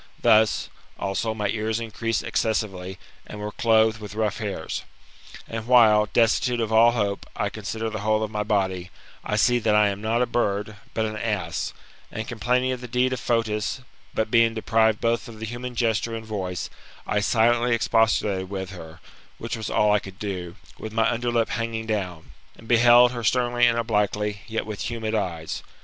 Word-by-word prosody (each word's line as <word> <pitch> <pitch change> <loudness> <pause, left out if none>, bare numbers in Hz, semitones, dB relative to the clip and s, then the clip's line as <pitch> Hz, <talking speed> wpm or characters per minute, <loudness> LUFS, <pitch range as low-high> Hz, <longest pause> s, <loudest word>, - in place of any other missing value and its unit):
Thus, 110 0 +4 0.3
also, 100 +3 -2
my 105 -1 -1
ears 110 +1 -1
increase 115 0 -2
excessively, 95 -4 -2 0.3
and 105 - -8
were 105 0 -4
clothed 110 0 +3
with 105 -1 -9
rough 110 -1 -1
hairs. 100 -7 -4 0.7
And 115 0 -5
while, 110 -4 +6
destitute 120 +2 +2
of 110 -1 -1
all 115 +1 +6
hope, 100 -4 -1
I 105 - -1
consider 110 +2 -4
the 110 -1 -4
whole 110 +1 +1
of 110 - -4
my 105 -1 -2
body, 95 -4 -1 0.3
I 105 - -2
see 120 +3 +3
that 110 -2 +2
I 105 -1 +5
am 100 0 -5
not 115 +3 +1
a - - +2
bird, 105 -3 -1 0.2
but 110 - +1
an 110 -1 -4
ass; 100 -7 -2 0.4
and, 110 +1 -5
complaining 125 +2 0
of 125 -1 -4
the 125 - -7
deed 125 +2 +1
of 130 - -3
Fotis, 115 +1 -1 0.3
but, 110 -1 -2
being 115 -1 +4
deprived 110 -1 +2
both 115 0 0
of 115 -2 -11
the 110 - -4
human 120 +2 -6
gesture 115 -1 0
and 110 0 -6
voice, 95 -5 -4 0.3
I 105 - 0
silently 120 +2 +3
expostulated 105 -4 +1
with 95 -1 -5
her 85 -2 -11 0.4
(which 115 - -4
was 110 -1 -5
all 105 0 +3
I 105 - +4
could 95 -1 -11
do), 90 -4 -5 0.2
with 110 - -7
my 115 0 +2
under 120 +1 -1
lip 115 -1 +1
hanging 115 -1 -3
down, 95 -7 -4 0.3
and 115 - -15
beheld 120 +1 +6
her 120 -2 -5
sternly 120 +1 +3
and 115 -1 +2
obliquely, 105 -2 0
yet 110 0 -3
with 110 0 -4
humid 115 -2 -3
eyes. 85 -7 -3
110 Hz, 185 wpm, -24 LUFS, 105-115 Hz, 0.7 s, while